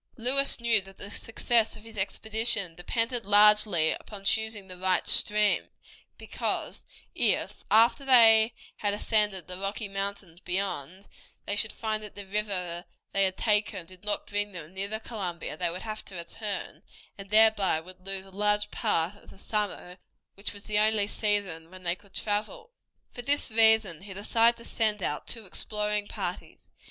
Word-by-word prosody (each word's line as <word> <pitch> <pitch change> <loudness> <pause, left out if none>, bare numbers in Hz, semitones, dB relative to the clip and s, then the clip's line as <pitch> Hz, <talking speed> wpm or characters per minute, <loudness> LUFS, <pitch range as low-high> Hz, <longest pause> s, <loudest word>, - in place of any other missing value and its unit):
Lewis 265 +4 +1
knew 235 -3 +3
that 195 0 -15
the 200 - -7
success 225 0 +1
of 215 - -14
his 225 0 -13
expedition 215 -1 +1
depended 230 +7 -1
largely 205 -4 +5
upon 205 -2 -8
choosing 220 -1 +1
the 185 - -8
right 185 0 0
stream, 210 0 +3 0.5
because - - -4 0.3
if, - - 0
after 230 +6 +4
they 225 -4 +6 0.2
had 205 -1 -1
ascended 210 -4 +1
the 180 0 -6
Rocky 200 +2 -3
Mountains 195 -3 -4
beyond, 185 -1 -3 0.4
they 205 - -2
should 215 +1 +2
find 215 -1 -3
that 210 -1 -10
the 200 - -8
river 190 -4 -3 0.3
they 195 0 +2
had 190 0 -2
taken 210 -5 +1
did 185 +2 -15
not 210 0 -1
bring 205 0 -3
them 170 -1 -9
near 195 +1 -2
the 220 +1 -5
Columbia, 185 -9 -6
they 175 +2 -1
would 180 +2 -6
have 215 -1 -6
to 190 - -8
return, 180 -1 -5 0.3
and 195 0 -11
thereby 215 -5 +4
would 185 +2 -13
lose 195 0 -4
a 195 - -15
large 210 +1 0
part 165 +4 0
of - - -20
the - - -15
summer, 200 -3 -3 0.3
which 200 - -3
was 205 0 -11
the 210 -1 0
only 215 -1 +3
season 200 -6 -1
when 185 0 -14
they 170 -1 0
could 200 0 -23
travel. 335 - -3 0.4
For 245 - -7
this 280 0 +2
reason 220 -6 +4
he 195 -1 -10
decided 230 +3 +2
to 235 - -12
send 215 -4 0
out 150 - -3
two 225 -3 -3
exploring 210 +2 -2
parties. - - -6
205 Hz, 170 wpm, -27 LUFS, 190-220 Hz, 0.5 s, they